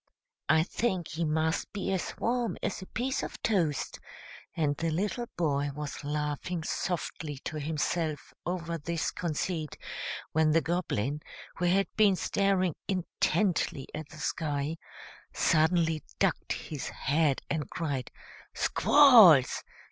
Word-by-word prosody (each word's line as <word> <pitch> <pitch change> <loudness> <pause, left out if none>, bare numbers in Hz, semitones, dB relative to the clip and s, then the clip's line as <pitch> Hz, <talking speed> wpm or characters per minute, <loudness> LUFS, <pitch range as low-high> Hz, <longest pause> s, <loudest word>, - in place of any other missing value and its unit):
I 160 - +5
think 185 -2 -1
he 165 +2 -2
must 160 +1 0
be 195 -1 -3
as 185 - -3
warm 240 0 0
as - - -2
a 185 - -9
piece 260 +3 -1
of - - -6
toast;" 170 -10 0 0.6
and 150 -3 +1
the 165 +3 -1
little 205 +9 -1
boy 145 -4 +1
was 150 -1 -5
laughing 150 +3 -2
softly 160 -4 -3
to 155 - -3
himself 155 0 -2
over 170 -2 -3
this 165 +2 -2
conceit, 160 -1 -3 0.5
when 155 -1 +3
the 165 - +4
Goblin, 150 - -1 0.4
who 180 - 0
had 190 +3 +3
been 205 -3 +5
staring 190 -2 +1
intently 185 -5 0
at 155 -2 -6
the 155 - -12
sky, 150 0 -2 0.6
suddenly 160 0 +2 0.2
ducked - - +1
his 150 -4 -5
head, 145 -1 +1
and 150 -4 -2
cried 140 -6 -3 0.5
"Squalls!" 220 - +7
160 Hz, 125 wpm, -29 LUFS, 150-185 Hz, 0.6 s, Squalls